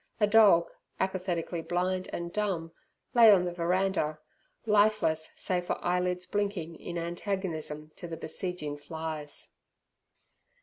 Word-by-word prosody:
A 210 - +5
dog, 205 -5 +6 0.3
apathetically 180 -3 -1
blind 185 +2 -1
and 170 0 -5
dumb, 185 -6 -1 0.4
lay 230 -3 +9
on 185 -3 +5
the 175 - -3
veranda, 175 -2 0 0.5
lifeless 210 -7 +3
save 180 -1 -1
for - - 0
eyelids 180 0 0
blinking 200 -5 -2
in 175 - -5
antagonism 170 -3 -3
to 175 - -7
the 165 -1 -6
besieging 165 -4 -3
flies. 155 -1 -5
180 Hz, 120 wpm, -29 LUFS, 165-190 Hz, 0.5 s, lay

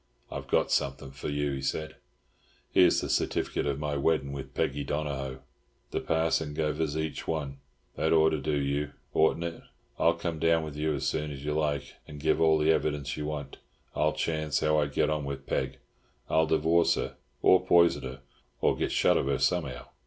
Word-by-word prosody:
"I've - - -6
got - - +2
something 70 -1 -1
for 70 +2 -6
you," 75 0 -1
he 70 0 -3
said. 80 +3 -3 0.7
"Here's - - +5
the - - -3
certificate - - 0
of 70 -1 0
my 75 -1 -2
weddin' 70 -1 +1
with 70 -1 -7
Peggy 70 +1 0
Donohoe. 70 -3 -3 0.5
The - - -1
parson 80 -2 0
gev 75 0 -1
us 75 -2 -1
each 80 0 -3
one. 70 -4 -3 0.4
That 80 - 0
ought 80 -1 +5
to 80 - -1
do 75 -1 0
you, 70 +1 -1 0.2
oughtn't 80 +2 +3
it? 85 -1 -5 0.4
I'll 85 0 +4
come 85 -1 -3
down 80 0 +3
with 75 -2 -6
you, 75 0 0
as 70 -1 -3
soon 75 +2 -1
as 70 -1 -7
you 75 - 0
like, 75 -3 -1
and 75 - -9
give 80 +2 +1
all 80 -1 +5
the 75 +1 +3
evidence 75 -3 0
you 75 -1 -4
want. 70 -2 -5 0.4
I'll 75 0 +2
chance 80 -1 -1
how 75 0 +3
I 75 - +1
get 70 +2 +1
on 75 -1 -1
with 70 -1 -5
Peg. 65 -1 -2 0.5
I'll 80 0 +4
divorce 80 +2 +3
her, - - -4 0.3
or 95 - +6
poison 85 -1 +4
her, 65 0 -7 0.4
or - - +2
get - - -1
shut - - +3
of - - 0
her 70 -1 +1
somehow. 75 -7 0
75 Hz, 195 wpm, -29 LUFS, 70-80 Hz, 0.7 s, or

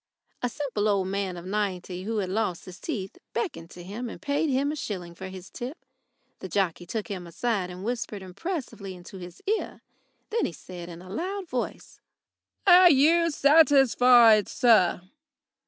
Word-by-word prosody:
A 245 - 0
simple 240 -6 -2
old 195 -2 +1
man 195 -2 -2
of 175 - -9
ninety, 185 -2 -3
who 225 +1 -2
had 190 -3 -1
lost 200 -4 -1
his 185 0 -11
teeth, 205 - -5
beckoned 315 - -3
to 175 - -11
him 220 +7 -6
and - - -9
paid 290 +1 0
him 275 +2 +1
a - - -4
shilling 180 - -5
for 190 +2 -8
his 185 0 -10
tip. 255 +7 -6 0.6
The 190 - -7
jockey 175 -2 -1
took 215 +3 -3
him 185 -5 -6
aside 195 +1 -1
and 180 +1 -8
whispered 225 -3 -3
impressively 200 - -5
into 180 +2 -11
his 175 -1 -11
ear. 430 +2 -2 0.5
Then 460 - +1
he 175 - -7
said, 175 +1 -9
in 170 +1 -10
a 185 - -12
loud 375 - -3
voice: 250 -5 -5 0.7
"Are 360 -1 +8
you 330 +4 +4
satisfied, 255 - +6
sir?" 215 -9 +4
210 Hz, 170 wpm, -26 LUFS, 185-275 Hz, 0.7 s, Are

